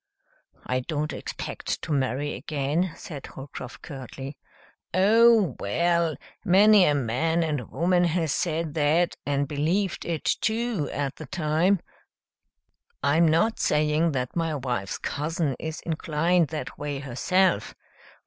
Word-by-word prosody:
"I 125 0 0
don't 150 +3 -3
expect - - -4
to - - -4
marry 140 +1 0
again," 155 +5 -1
said 145 -5 -8
Holcroft 135 -2 -9
curtly. 135 -1 -8 0.6
"Oh, 220 +1 +5
well! 170 +8 +1 0.3
Many 200 +1 +6
a 145 - +3
man 145 +7 +1
and 145 -7 -2
woman 175 +1 +2
has 165 -2 0
said 165 -2 -1
that 160 +3 +2
and 140 0 +1
believed 165 +7 0
it, 165 -3 -3
too, 225 -7 0
at 140 -2 -3
the 155 - -8
time. 170 +3 +1 1.2
I'm 155 +4 +4
not 170 +9 +2
saying 150 +2 +2
that 125 -2 -3
my 165 -2 0
wife's 125 -8 -3
cousin 150 -1 -2
is 160 0 -5
inclined 165 +1 +1
that 155 0 -6
way 145 -1 -3
herself. 170 +8 +1
155 Hz, 125 wpm, -26 LUFS, 145-175 Hz, 1.2 s, Many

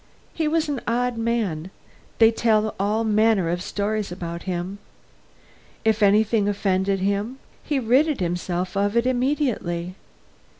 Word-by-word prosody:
He 320 -2 -1
was 320 +1 +1
an 285 -4 -2
odd 245 +1 0
man; 225 -8 -1 0.5
they 225 0 +6
tell 220 -2 +1
all 210 +3 +1
manner 215 -5 +2
of 175 0 -2
stories 205 +1 -2
about 170 -1 -5
him. 180 +3 -3 1.1
If 220 0 +2
anything 210 +1 +3
offended 195 -1 0
him, 200 +6 -1 0.3
he 295 - -1
rid 265 +4 +2
himself 180 +1 -2
of 205 +3 +1
it 235 - +3
immediately. 245 - -1
210 Hz, 130 wpm, -23 LUFS, 190-235 Hz, 1.1 s, they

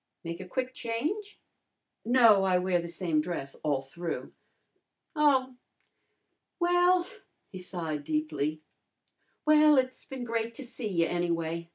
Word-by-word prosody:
Make 170 0 -5
a 185 - -8
quick 255 +5 -3
change?" 305 - -3 0.7
"No, 230 -4 +6
I 185 -1 +3
wear 180 -1 +1
the 170 - -6
same 170 -3 0
dress 150 -5 -4
all 140 -3 0
through." 170 +5 -6 0.8
"Oh! 265 -4 +3 1.0
Well," 355 0 +4 0.5
he 185 - -7
sighed 165 -5 -4
deeply 155 - -2 0.8
"well, 305 -1 +6
it's 255 0 0
been 265 -2 -6
great 230 -1 -2
to 275 - -6
see 245 -2 -6
you, 170 -4 +1
anyway. 170 -1 -2
210 Hz, 130 wpm, -29 LUFS, 170-265 Hz, 1.0 s, No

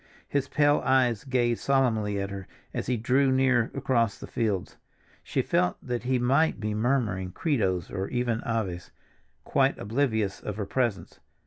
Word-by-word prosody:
His 140 -1 -1
pale 145 0 +3
eyes 130 -5 +2
gazed 120 -3 0
solemnly 110 -7 +1
at 100 0 -3
her 95 -1 -7 0.3
as - - -3
he 125 -1 +1
drew 130 +4 +2
near 130 -3 +3
across 120 -6 +1
the - - -8
fields; 105 -6 -2 0.4
she - - -1
felt 90 - +1
that 125 -1 -3
he 130 0 +2
might 135 +4 +2
be 105 -1 -2
murmuring 105 -5 0
Credos, 95 - 0
or 95 +1 -3
even 120 -2 -1
Aves, 100 -6 -3 0.5
quite - - +2
oblivious 110 -3 0
of 105 - -5
her 105 -1 -3
presence. 120 -1 -2
120 Hz, 155 wpm, -27 LUFS, 105-130 Hz, 0.5 s, pale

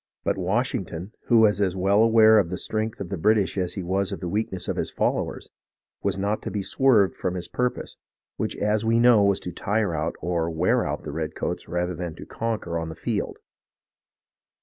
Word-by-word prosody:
But - - +1
Washington, 95 -2 -2 0.2
who 115 -2 +5
was 105 -2 +4
as 95 -2 +1
well 100 +3 +3
aware 110 -1 +6
of 90 -5 0
the 90 - -3
strength 110 +3 -3
of 95 - -5
the 95 - -4
British 105 +1 +2
as 90 -3 -2
he 95 - -4
was 95 +2 -1
of 100 - -4
the 90 - -4
weakness 95 0 -2
of - - -1
his - - -2
followers, - - -2 0.5
was - - 0
not 100 +2 -1
to - - -4
be 100 -2 -3
swerved 110 -7 +3
from 90 0 -2
his 90 -1 -5
purpose, 125 0 -2 0.4
which - - -3
as 105 +1 0
we 115 +1 +2
know 120 -3 +6
was 100 -1 +3
to 90 - -5
tire 100 +1 -1
out 80 +1 -2
or 85 0 -1
wear 85 +2 +1
out - - -3
the - - -5
redcoats 80 -1 -4
rather 90 +1 -1
than 85 -1 -5
to - - -10
conquer 105 -7 -3
on 80 0 -4
the 80 - -7
field. - - -3
95 Hz, 205 wpm, -25 LUFS, 90-110 Hz, 0.5 s, aware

